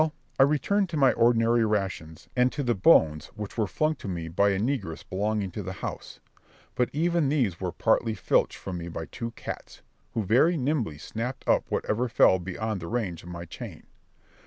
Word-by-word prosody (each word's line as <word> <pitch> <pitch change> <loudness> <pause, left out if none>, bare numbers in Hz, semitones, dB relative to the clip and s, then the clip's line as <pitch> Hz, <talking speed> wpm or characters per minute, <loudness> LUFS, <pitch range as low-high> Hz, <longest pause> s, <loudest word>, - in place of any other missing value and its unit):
Well, 155 -1 +1 0.3
I - - +9
returned 195 +6 +1
to 165 - -3
my 135 -3 +5
ordinary 115 0 +3
rations, 95 -7 -2
and 125 0 +3
to 145 - -2
the 120 -2 +2
bones 80 - +4
which 105 -2 -6
were 110 -3 0
flung 155 +10 +1
to - - -8
me 85 -3 -4
by 100 +5 +3
a 100 - +1
negress 110 - -2
belonging 100 0 -1
to 105 - -5
the 95 0 -5
house; - - -7 0.5
but 125 - +1
even 165 -1 +1
these 120 - +1
were 90 -2 -1
partly 110 +6 +1
filched 95 - +1
from 90 -2 -5
me 85 - -6
by 80 -1 -5
two 115 +7 -5
cats, - - -8 0.3
who 110 - 0
very 135 - +4
nimbly 130 - -1
snapped 115 - -5
up - - +3
whatever 120 +4 -1
fell 95 -4 +5
beyond 95 +4 -3
the 85 - -6
range 105 -7 -2
of 85 - -11
my 85 -1 -6
chain. 85 - -9
110 Hz, 195 wpm, -27 LUFS, 95-130 Hz, 0.5 s, I